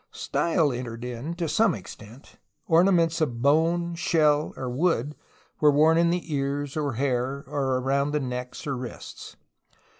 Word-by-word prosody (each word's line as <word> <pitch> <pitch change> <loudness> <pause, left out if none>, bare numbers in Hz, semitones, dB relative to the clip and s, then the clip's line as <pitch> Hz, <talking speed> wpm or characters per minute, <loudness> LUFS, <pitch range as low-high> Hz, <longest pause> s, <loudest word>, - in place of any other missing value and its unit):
Style 165 -5 0
entered 120 -1 -6
in 125 +7 -5
to 170 -1 -2
some 185 +5 +2
extent. 110 +6 -12 0.3
Orna 175 +4 +4
ments 165 -2 +2
of 120 -7 -1
bone, 165 +4 +2
shell, 155 -3 +2
or 130 - -5
wood 145 +1 0 0.4
were 150 - +5
worn 155 +3 +4
in 170 0 +3
the 170 -2 -2
ears 140 0 -2
or 145 -4 -1
hair 130 +2 -1
or 135 -2 -1
around 140 +2 0
the 150 0 0
neck 125 -2 -5
or 140 -2 -2
wrists. 125 -1 -8
145 Hz, 155 wpm, -26 LUFS, 130-165 Hz, 0.4 s, were